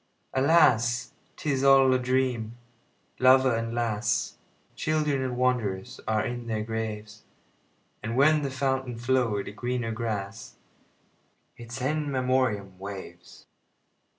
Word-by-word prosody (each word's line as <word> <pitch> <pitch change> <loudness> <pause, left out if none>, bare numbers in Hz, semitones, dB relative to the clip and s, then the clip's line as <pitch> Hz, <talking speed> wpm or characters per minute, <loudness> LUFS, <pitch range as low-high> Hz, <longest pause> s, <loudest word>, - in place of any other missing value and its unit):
Alas! 130 -5 +3 0.2
't - - -8
is 135 -1 0
all 135 -1 +6
a 130 - +2
dream. 125 -3 -1 0.6
Lover 130 -1 +5
and 115 0 -2
lass, 110 -2 -1 0.3
Children 150 -3 0
and 130 -2 -3
wanderers, 115 -7 -1
are 110 -1 +1
in 120 -2 -5
their 110 -2 -2
graves; 110 -1 -5 0.8
And 115 +2 -4
where 155 +3 +5
the 140 -2 -2
fountain 130 -2 -2
flow'd 120 -4 0
a - - -5
greener 120 +1 -3
grass—Its 115 +2 -9
In 150 +1 -1
Memoriam—waves. 100 -7 -3
120 Hz, 110 wpm, -27 LUFS, 110-130 Hz, 0.8 s, all